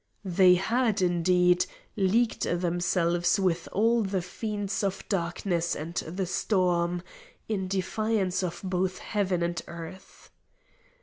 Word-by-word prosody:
They 180 0 +5
had, 220 +4 +1
indeed, 180 0 +3 0.3
leagued 220 +5 +2
themselves 175 +1 +1
with 180 -3 0
all 230 +3 +3
the 195 -3 -1
fiends 205 +2 -3
of 195 0 -2
Darkness 175 -2 -1
and 160 +3 -6
the 180 +2 -3
Storm, 175 -2 0 0.4
in 195 -4 -2
defiance 195 0 0
of 175 -2 -4
both 185 0 -1
Heaven 190 -5 -1
and 170 0 -2
Earth. 170 +2 -10
185 Hz, 115 wpm, -28 LUFS, 175-195 Hz, 0.4 s, They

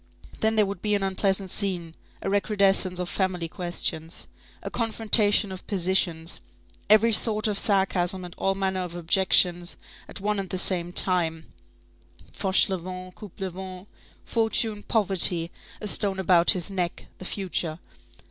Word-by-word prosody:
Then 220 0 +1
there 215 -1 +4
would 195 -2 -6
be 210 -1 +1
an 200 - -1
unpleasant 190 0 0
scene; 180 -5 0 0.3
a - - -3
recrudescence 195 -2 +1
of 180 - -3
family 180 -3 -2
questions, 165 -1 -3 0.4
a - - -5
confrontation 215 -3 +2
of 185 - -9
positions, 175 -3 0 0.5
every 215 +2 +5
sort 215 0 +2
of 210 - -1
sarcasm 190 -2 +1
and 175 - -10
all 195 0 0
manner 190 -1 -1
of 180 -2 -5
objections 175 0 +2 0.3
at - - -5
one 205 +1 -1
and 190 -2 -5
the 185 - -3
same 175 -2 +3
time, 165 -3 0 0.8
Fauchelevent, 185 -1 -1
Coupelevent, 190 -2 -8 0.4
fortune, 225 -2 0
poverty, 180 -6 +3 0.3
a - - -7
stone 200 -1 -1
about 180 -2 +4
his 180 +1 +4
neck, 180 -3 -3
the - - -9
future. 180 -5 -3
190 Hz, 140 wpm, -25 LUFS, 175-205 Hz, 0.8 s, every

